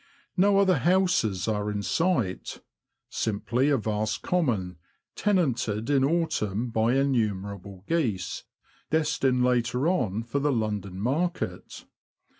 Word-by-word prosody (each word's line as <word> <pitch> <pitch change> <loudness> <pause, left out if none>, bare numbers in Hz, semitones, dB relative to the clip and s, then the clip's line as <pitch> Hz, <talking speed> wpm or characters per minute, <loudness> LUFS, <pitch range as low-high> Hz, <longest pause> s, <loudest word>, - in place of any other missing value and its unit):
No 195 +2 +4
other 190 -6 +4
houses 175 - +2
are 105 -1 -1
in 105 -1 -3
sight 120 - -1 0.3
— - - -57
simply 115 +5 0
a 140 - +3
vast 110 -1 -2
common, 110 - 0 0.4
tenanted 130 - 0
in 135 -2 +3
autumn 125 - 0
by 115 +2 +2
innumerable 100 -7 -1
geese, 115 - -1 0.5
destined 135 -5 +1
later 125 +3 +1
on 115 - 0
for 120 +5 -2
the 145 +1 +1
London 105 -5 -2
market. 155 - -2
120 Hz, 115 wpm, -27 LUFS, 105-155 Hz, 0.5 s, No